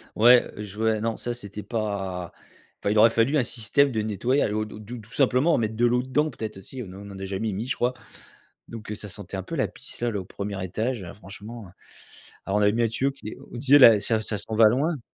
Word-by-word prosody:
Ouais, 120 +2 +6
heu, 105 - -5
je 105 -1 -10
vois, 110 -1 +1
non 115 0 -1
ça 120 - -3
c'était 105 -3 -8
pas 95 -6 -3 0.5
enfin, 100 - -1
il 105 - +1
aurait 115 +2 +8
fallu 115 +7 +2
un 130 - +3
système 125 +5 +2
de 110 -3 -1
nettoyage, 110 +3 0
ou 110 0 -1
tout 105 0 -10
tout 115 +4 -8
tout 110 +2 -15
simplement 130 +9 +3
mettre 110 -1 -1
de 120 +2 +2
l'eau 125 +1 +3
dedans, 150 +4 +1
peut-être 110 -5 -6
aussi, 125 +7 -8
on 90 - -11 0.2
en 95 - -9
a 95 - -4
jamais 100 +3 -2
mis, 105 +6 -4
je - - -1
crois. 125 +1 0 0.7
Donc 110 -2 -8
heu 105 - -3
ça 105 0 -9
sentait 100 0 -7
un 95 - -4
peu - - -6
la - - +1
pisse - - -9
là 120 - +1
là, 105 - -2
au 95 - -7
1er 100 0 -5
étage 110 +3 -2
franchement, 105 +3 -10
heu. - - -16 0.7
Alors 100 +2 +1
on - - +1
avait 105 - +5
mis 120 - +1
un 115 - +3
tuyau 135 +5 0
qui 135 -6 -9
est - - -9
on - - -7
disait 140 +3 +5
là, 115 -5 +9
ça 110 +1 0
ça 105 -1 -3
s'en 110 +3 -4
va 110 0 +7
loin. 145 +6 0
110 Hz, 260 wpm, -25 LUFS, 105-120 Hz, 0.7 s, là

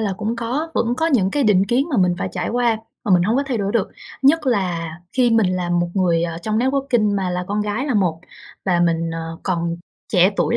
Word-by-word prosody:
là 205 -3 0
cũng 215 +4 -3
có, 265 +8 -2
vẫn 235 +1 +1
có 325 - +1
những 210 - +2
cái 290 - 0
định 200 -3 +4
kiến 255 +6 +1
mà 260 - 0
mình 180 -2 +3
phải 95 - -2
trải - - -3
qua 240 -2 +1 0.3
mà 200 - +2
mình 175 - +4
hông 220 +7 +1
có 280 - +2
thay 250 -5 -1
đổi 200 0 -1
được. 220 -5 +1 0.3
Nhất 300 +2 +4
là 180 -8 0 0.3
khi 245 -2 +4
mình 225 -4 +4
là 175 -1 -2
một 175 0 +1
người, 175 -4 +2
ờ, 170 -1 -3
trong 215 0 0
networking 255 -5 +1
mà 190 -2 -1
là 180 0 -2
con 210 +1 -1
gái 210 +7 -2
là 265 - -1
một 175 -6 +1 0.4
và 175 -3 +2
mình, 165 -1 +1
ờ, 165 0 -6
còn 170 -2 -1 0.4
trẻ 185 +1 +5
tuổi 170 -3 +1
205 Hz, 245 wpm, -20 LUFS, 175-240 Hz, 0.4 s, trẻ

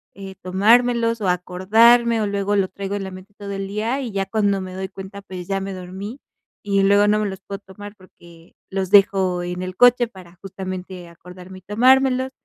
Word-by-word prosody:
eh, 195 -1 -9
tomármelos 230 +4 +2
o 190 - 0
acordarme, 220 +6 +3
o 210 - 0
luego 200 0 -1
lo 190 -1 +2
traigo 195 +1 -5
en 200 - -4
la 190 - -6
mente 185 +2 -12
todo 200 -1 -8
el 195 0 -4
día, 225 +7 -2
y 245 - -5
ya 195 -1 -2
cuando 200 -2 0
me 185 -1 -7
doy 190 0 -5
cuenta, 195 +1 -10
pues, 180 -2 -9
ya 195 -1 -2
me 195 0 -5
dormí, 190 +7 -8 0.5
y 200 -1 +2
luego 200 +1 +4
no 210 - +2
me 210 - -1
los 190 0 -8
puedo 200 +1 -7
tomar 205 +1 -12
porque 170 -3 -19 0.2
los 190 -1 -3
dejo 190 -3 +3
en 180 +1 -5
el 185 0 -6
coche 245 +1 +5
para 185 -5 -15
justamente 185 -2 -7
acordarme 180 +2 -13
y - - -25
tomármelos. 260 +5 +3
195 Hz, 205 wpm, -21 LUFS, 185-210 Hz, 0.5 s, coche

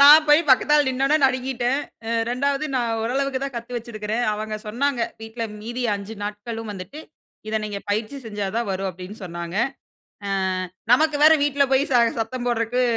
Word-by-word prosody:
நான் 300 +2 +9
போய் 295 +2 +7
பக்கத்தால 295 +3 +5
நின்னவுனே 270 +4 +2
நடுங்கிட்டேன். 255 0 +1 0.3
அ - - -4 0.2
2ஆவது 280 +4 0
நான் 240 -2 +1
ஓரளவுக்கு 270 +3 0
தான் 275 -2 -5
கத்து 235 +1 -5
வச்சிருக்றேன். 225 -1 -3
அவுங்க 215 0 -3
சொன்னாங்க 245 +4 0 0.2
வீட்ல 225 +1 -5 0.2
மீதி 240 +3 -4
5 200 +2 -6
நாட்களும் 215 +2 -5
வந்துட்டு, 195 - -8 0.5
இத 220 - 0
நீங்க 205 -1 -4
பயிற்சி 215 +6 -1
செஞ்சா 205 -2 -3
தான் 235 -3 -1
வரும். 195 0 -1
அப்டின்னு 185 +4 -10
சொன்னாங்க. 170 +1 -6 0.7
அ - - -3 0.6
நமக்கு 305 +3 +4
வேற 315 - +9
வீட்ல 285 -1 +3
போய் 275 +4 +3
ச - - +2 0.2
சத்தம் 240 +2 -3
போட்றதுக்கு 240 +1 +1
240 Hz, 160 wpm, -23 LUFS, 215-270 Hz, 0.7 s, நான்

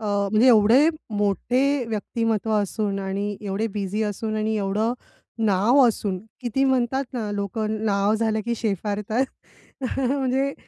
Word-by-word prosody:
अ, - - -7 0.3
म्हणजे 215 +4 +4
एवढे 235 +6 +6 0.3
मोठे 250 +7 +1
व्यक्तिमत्त्व 225 0 -1
असून 205 0 -2
आणि 200 +1 -3
एवढे 205 +1 -2
बिझी 205 +1 -2
असून 215 +1 -3
आणि 215 +1 0
एवढं 210 +3 0 0.5
नाव 210 +7 +4
असून, 205 -4 -1 0.2
किती 255 +2 0
म्हणतात 265 0 +1
ना, 225 -4 -3
लोकं 215 +2 -2
नाव 200 0 +2
झालं 220 -1 0
की 235 - 0
शेफारतात 210 +3 -1 0.6
अ, - - -1 0.3
म्हणजे 270 +1 0
215 Hz, 135 wpm, -24 LUFS, 205-240 Hz, 0.6 s, एवढे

